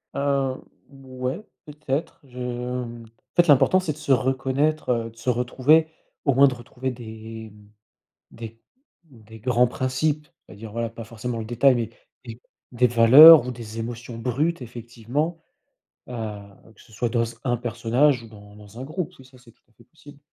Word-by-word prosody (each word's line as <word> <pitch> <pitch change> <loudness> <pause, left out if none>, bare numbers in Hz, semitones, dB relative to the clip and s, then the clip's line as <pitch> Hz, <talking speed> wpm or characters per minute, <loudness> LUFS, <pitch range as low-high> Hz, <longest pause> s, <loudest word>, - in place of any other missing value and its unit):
Heu, 140 -2 -1 0.3
ouais, 130 +4 -6 0.2
peut-être 150 0 -4
je 125 -2 -17
hem, 125 -1 -5
en 115 +1 -27
fait 175 0 +4
l'important 150 +6 +5
c'est 165 -5 -3
de 145 - -17
se 140 - -3
reconnaître, 135 +4 0
heu, 115 -1 -1
de 115 - -20
se 120 +3 -3
retrouver, 130 +6 +2 0.4
au 140 - +3
moins 140 +1 +7
de 130 - -1
retrouver 125 +1 -6
des, 110 -2 -9
hem, 105 0 -18 0.6
des 115 0 -10 0.4
des 110 -7 -16
grands 125 +2 +2
principes. 140 +5 -2 0.2
C'est-à-dire, 105 +1 -11
voilà, 115 0 -3
pas 115 0 -9
forcément 115 +2 -6
le 110 - -5
détail, 125 +3 +3
mais 115 -2 -2 0.4
des 115 0 -10 0.3
des 125 0 +3
valeurs 125 +6 +9
ou - - -3
des 115 -2 -9
émotions 120 +1 -6
brutes 135 +7 -1
effectivement, 120 +7 -4 0.7
heu, 125 - -9 0.6
que - - -19
ce 110 - -20
soit 120 +2 -2
dans 115 -1 +1 0.2
un 120 -2 0
personnage 120 +3 +1
ou 115 - -13
dans 105 -1 -15
dans 105 +2 -13
un 130 - -5
groupe, 160 +4 -5
oui 130 - -15
ça, 130 0 -19
c'est 120 -1 -19
tout - - -38
à - - -32
fait - - -21
possible. 145 -2 -17
125 Hz, 175 wpm, -23 LUFS, 115-140 Hz, 0.7 s, valeurs